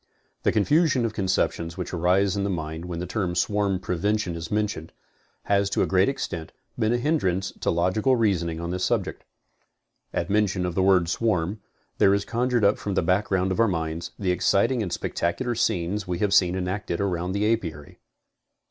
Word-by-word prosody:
The -, -, +2 dB
confusion 145 Hz, -, +2 dB
of 110 Hz, -, -2 dB
conceptions 90 Hz, -4 st, -1 dB
which 90 Hz, -, -5 dB
arises 90 Hz, +3 st, +2 dB
in 100 Hz, -, -1 dB
the 100 Hz, -, -1 dB
mind 80 Hz, -2 st, -4 dB
when 90 Hz, -1 st, -5 dB
the 90 Hz, -, -3 dB
term 90 Hz, -1 st, -2 dB
swarm 100 Hz, 0 st, +1 dB
prevention 95 Hz, +1 st, -1 dB
is 85 Hz, 0 st, -6 dB
mentioned, 105 Hz, -6 st, -2 dB, 0.5 s
has 100 Hz, 0 st, +1 dB
to -, -, +1 dB
a -, -, +2 dB
great 95 Hz, +5 st, +3 dB
extent, 85 Hz, -11 st, -5 dB, 0.3 s
been 110 Hz, 0 st, +2 dB
a 120 Hz, -, +2 dB
hindrance 95 Hz, -, 0 dB
to -, -, -1 dB
logical 95 Hz, +10 st, +2 dB
reasoning 90 Hz, -8 st, 0 dB
on 85 Hz, +1 st, -4 dB
this 90 Hz, 0 st, -2 dB
subject. -, -, -1 dB, 0.9 s
At 85 Hz, -, -2 dB
mention 100 Hz, -2 st, +1 dB
of 90 Hz, -, -2 dB
the 95 Hz, -, +1 dB
word 95 Hz, -3 st, +4 dB
swarm, 100 Hz, 0 st, 0 dB, 0.4 s
there 100 Hz, 0 st, +5 dB
is 100 Hz, 0 st, -2 dB
conjured 120 Hz, -1 st, +1 dB
up 100 Hz, -, +3 dB
from 100 Hz, -2 st, -3 dB
the -, -, +2 dB
background 95 Hz, +1 st, +1 dB
of 95 Hz, -, -2 dB
our 115 Hz, -, +5 dB
minds, 80 Hz, -2 st, -3 dB
the 95 Hz, -3 st, 0 dB
exciting 100 Hz, +7 st, +2 dB
and 95 Hz, -5 st, -3 dB
spectacular 120 Hz, +9 st, -2 dB
scenes 100 Hz, -3 st, -1 dB
we 90 Hz, -1 st, -2 dB
have 100 Hz, +1 st, 0 dB
seen 90 Hz, -2 st, +4 dB
enacted 90 Hz, -1 st, -3 dB
around 90 Hz, -2 st, -1 dB
the 100 Hz, +1 st, 0 dB
aipary. 80 Hz, -9 st, -8 dB
95 Hz, 185 wpm, -25 LUFS, 85-105 Hz, 0.9 s, there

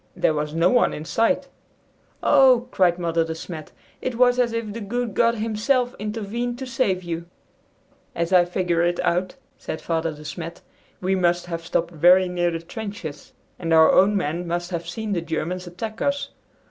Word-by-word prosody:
There -, -, +2 dB
was 150 Hz, 0 st, -3 dB
no 170 Hz, +2 st, +3 dB
one 245 Hz, -, +3 dB
in 150 Hz, -, -7 dB
sight." 225 Hz, +9 st, +1 dB, 0.8 s
"Oh," 260 Hz, -4 st, +5 dB
cried 175 Hz, -2 st, +3 dB
Mother 165 Hz, -2 st, +1 dB
De 160 Hz, 0 st, -4 dB
Smet, 160 Hz, -1 st, -8 dB, 0.3 s
"it 255 Hz, -, -3 dB
was 245 Hz, +1 st, +4 dB
as 240 Hz, -2 st, +2 dB
if 230 Hz, -2 st, -3 dB
the 230 Hz, -, -6 dB
good 235 Hz, +2 st, -3 dB
God 235 Hz, 0 st, +3 dB
himself 230 Hz, +3 st, 0 dB
intervened 225 Hz, +3 st, -3 dB
to 265 Hz, -, -5 dB
save 200 Hz, -8 st, 0 dB
you!" 170 Hz, 0 st, -5 dB, 0.9 s
"As 170 Hz, +2 st, -1 dB
I 180 Hz, -1 st, +6 dB
figure 175 Hz, -1 st, 0 dB
it 175 Hz, 0 st, +1 dB
out," 180 Hz, +2 st, 0 dB, 0.2 s
said 160 Hz, -, -5 dB
Father 165 Hz, -1 st, -1 dB
De 150 Hz, 0 st, -11 dB
Smet, 165 Hz, +3 st, -7 dB, 0.4 s
"we 185 Hz, +1 st, +1 dB
must 175 Hz, -2 st, +1 dB
have 165 Hz, -1 st, -5 dB
stopped 170 Hz, 0 st, -1 dB
very 180 Hz, +3 st, +5 dB
near 175 Hz, -1 st, 0 dB
the 165 Hz, -1 st, -4 dB
trenches, 200 Hz, -5 st, -7 dB, 0.3 s
and 165 Hz, -2 st, -3 dB
our 160 Hz, 0 st, +7 dB
own 205 Hz, +2 st, +4 dB
men 170 Hz, 0 st, -2 dB
must 175 Hz, +1 st, -3 dB
have 170 Hz, -1 st, -4 dB
seen 215 Hz, +3 st, -3 dB
the 175 Hz, -, 0 dB
Germans 180 Hz, +2 st, -3 dB
attack 215 Hz, +6 st, -6 dB
us. 280 Hz, 0 st, 0 dB
180 Hz, 185 wpm, -23 LUFS, 170-225 Hz, 0.9 s, our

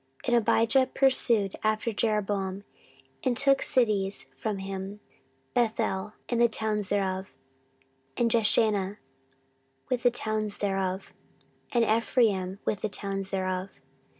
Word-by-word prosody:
14:013:019 -, -, -9 dB
And 240 Hz, -, +4 dB
Abijah 255 Hz, +3 st, +3 dB
pursued 235 Hz, -7 st, +2 dB
after 215 Hz, +1 st, 0 dB
Jeroboam, 200 Hz, -3 st, -1 dB, 0.6 s
and 250 Hz, -2 st, +1 dB
took 275 Hz, 0 st, +4 dB
cities 205 Hz, -, +1 dB
from 205 Hz, +9 st, -3 dB
him, 195 Hz, +1 st, -6 dB, 0.5 s
Bethel 215 Hz, -3 st, 0 dB
with 240 Hz, -, -1 dB
the 235 Hz, -, +6 dB
towns 215 Hz, -2 st, 0 dB
thereof, 190 Hz, -5 st, -2 dB, 0.8 s
and 235 Hz, -1 st, +2 dB
Jeshanah 210 Hz, -3 st, +2 dB, 0.9 s
with 250 Hz, -1 st, 0 dB
the 245 Hz, -, +5 dB
towns 215 Hz, -3 st, -2 dB
thereof, 195 Hz, -1 st, -2 dB, 0.6 s
and 235 Hz, -2 st, +3 dB
Ephraim 215 Hz, -4 st, +1 dB
with 210 Hz, -, -1 dB
the 215 Hz, -, -1 dB
towns 195 Hz, -1 st, -2 dB
thereof. 185 Hz, 0 st, -2 dB
210 Hz, 120 wpm, -28 LUFS, 195-230 Hz, 0.9 s, the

